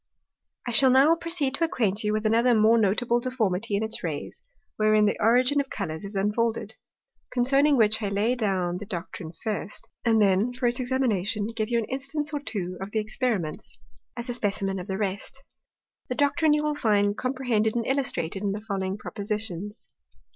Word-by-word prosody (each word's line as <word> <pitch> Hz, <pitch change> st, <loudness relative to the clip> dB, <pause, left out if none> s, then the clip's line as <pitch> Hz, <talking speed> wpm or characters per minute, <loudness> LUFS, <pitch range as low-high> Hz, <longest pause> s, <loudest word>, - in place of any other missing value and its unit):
I -, -, -1 dB
shall 260 Hz, +4 st, +5 dB
now 270 Hz, +5 st, +6 dB
proceed 335 Hz, -5 st, -1 dB
to 310 Hz, -, 0 dB
acquaint 225 Hz, -, 0 dB
you 210 Hz, -, +1 dB
with 215 Hz, +1 st, -1 dB
another 230 Hz, +3 st, +4 dB
more 220 Hz, +2 st, +5 dB
notable 230 Hz, +4 st, +2 dB
deformity 225 Hz, -5 st, -1 dB
in 205 Hz, -, 0 dB
its 220 Hz, +1 st, -3 dB
Rays, 155 Hz, -4 st, -5 dB, 0.3 s
wherein 215 Hz, 0 st, +4 dB
the 205 Hz, -, +2 dB
Origin 250 Hz, +5 st, +4 dB
of 275 Hz, -, -8 dB
Colours 160 Hz, -5 st, -4 dB
is 200 Hz, +1 st, -7 dB
unfolded: 215 Hz, +4 st, 0 dB, 0.6 s
Concerning 275 Hz, +3 st, +3 dB
which 220 Hz, -1 st, +3 dB
I 205 Hz, -, -1 dB
shall 200 Hz, -, -3 dB
lay 220 Hz, +5 st, +2 dB
down 190 Hz, -7 st, 0 dB
the 205 Hz, -, -8 dB
Doctrine 175 Hz, -3 st, -6 dB
first, 210 Hz, -2 st, -3 dB, 0.2 s
and 225 Hz, -2 st, +3 dB
then, 205 Hz, +4 st, +3 dB
for 250 Hz, 0 st, -3 dB
its 240 Hz, +1 st, +1 dB
Examination, 225 Hz, -6 st, 0 dB
give 215 Hz, -1 st, -1 dB
you 235 Hz, -, +1 dB
an 230 Hz, -, 0 dB
Instance 275 Hz, +4 st, -4 dB
or 295 Hz, -, -1 dB
two 190 Hz, -9 st, -4 dB
of 195 Hz, -, -5 dB
the 220 Hz, -, -3 dB
Experiments, 215 Hz, -, -2 dB, 0.4 s
as 235 Hz, +1 st, -5 dB
a 245 Hz, -, -2 dB
Specimen 195 Hz, -4 st, -1 dB
of 180 Hz, -, -7 dB
the 190 Hz, -2 st, -2 dB
rest. 205 Hz, +6 st, -4 dB, 0.7 s
The 250 Hz, -, -2 dB
Doctrine 295 Hz, +2 st, +3 dB
you 300 Hz, 0 st, +1 dB
will 300 Hz, 0 st, 0 dB
find 205 Hz, -7 st, +2 dB
comprehended 245 Hz, -4 st, 0 dB
and 230 Hz, -1 st, 0 dB
illustrated 255 Hz, -, -1 dB
in 200 Hz, -1 st, -1 dB
the 210 Hz, -, -5 dB
following 195 Hz, -2 st, -3 dB
Propositions. 205 Hz, -1 st, -4 dB
220 Hz, 185 wpm, -26 LUFS, 200-255 Hz, 0.7 s, now